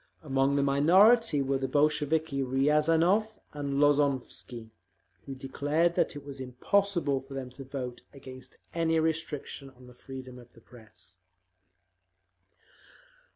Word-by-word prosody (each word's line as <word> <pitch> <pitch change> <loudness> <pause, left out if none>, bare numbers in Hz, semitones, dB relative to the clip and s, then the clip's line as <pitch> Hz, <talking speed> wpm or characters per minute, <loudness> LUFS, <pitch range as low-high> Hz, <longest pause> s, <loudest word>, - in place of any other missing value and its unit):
Among 135 -1 +1
the 140 - +2
minority 170 - +4
were 135 0 -1
the 135 - -2
Bolsheviki 150 +1 +1
Riazanov 160 +10 +2 0.2
and 140 -1 -3
Lozovsky, 140 -5 0 0.6
who 135 - -6
declared 145 +5 0
that 170 - 0
it 145 -1 -9
was 140 -1 -8
impossible 145 +3 0
for 135 0 -11
them 130 -2 -6
to 135 +2 -10
vote 130 -2 -6
against 130 -2 -12 0.2
any 165 -1 +1
restriction 160 -3 -3
on 130 -1 -18
the 125 - -14
freedom 130 0 -10
of 120 0 -17
the - - -18
Press. 95 -7 -15
140 Hz, 125 wpm, -29 LUFS, 130-155 Hz, 0.6 s, minority